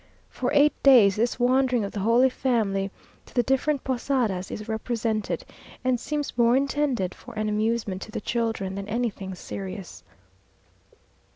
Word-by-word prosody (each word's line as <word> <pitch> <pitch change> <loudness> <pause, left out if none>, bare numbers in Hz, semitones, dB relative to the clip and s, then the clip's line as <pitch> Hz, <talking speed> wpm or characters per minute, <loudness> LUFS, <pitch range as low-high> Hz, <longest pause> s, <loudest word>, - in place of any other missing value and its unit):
For - - -2
eight 290 0 +5
days 235 -8 +7
this 235 +3 0
wandering 250 -1 +3
of 200 - -5
the 205 - -5
Holy 235 +6 +4
Family 210 -7 0 0.4
to - - -18
the 245 - +3
different 270 +2 +1
Posadas 240 -7 -1
is 215 +1 -6
represented, 220 -1 -2 0.4
and 255 -1 +1
seems 295 +3 -3
more 235 +1 +4
intended 275 -9 0
for 245 -1 -13
an 215 0 -1
amusement 215 -2 -1
to 220 - -8
the - - -3
children 225 -4 -2
than 200 +1 -5
anything 210 -5 -2
serious. 190 0 -7
230 Hz, 150 wpm, -25 LUFS, 205-255 Hz, 0.4 s, days